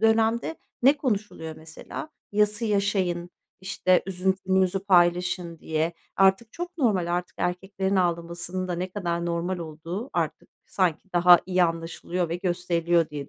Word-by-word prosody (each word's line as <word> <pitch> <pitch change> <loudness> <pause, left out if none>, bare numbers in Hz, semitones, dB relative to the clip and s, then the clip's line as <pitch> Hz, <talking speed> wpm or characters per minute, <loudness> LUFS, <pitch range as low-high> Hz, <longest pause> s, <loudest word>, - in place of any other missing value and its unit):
dönemde 225 +5 +2 0.3
ne 275 +3 +6
konuşuluyor 205 - -3
mesela? 160 - -8 0.2
"Yası 210 +2 +2
yaşayın, 195 -4 0 0.3
işte, 185 -1 +2
üzüntünüzü 190 0 +1
paylaşın." 175 -2 +2
diye, 160 +1 -1 0.2
artık 195 +4 +3
çok 350 0 -6
normal, 190 - +2
artık 180 0 -5
erkeklerin 190 +2 -1
ağlamasının 175 +1 -1
da - - -1
ne 185 +2 -3
kadar 170 -3 -2
normal 175 +2 -1
olduğu 170 - -6
artık - - -2 0.2
sanki 185 0 -1
daha 175 0 +8
iyi 185 -1 +3
anlaşılıyor 165 +1 -2
ve 170 - -2
gösteriliyor 175 -2 +1
diye 145 -2 -6
180 Hz, 130 wpm, -26 LUFS, 170-195 Hz, 0.3 s, daha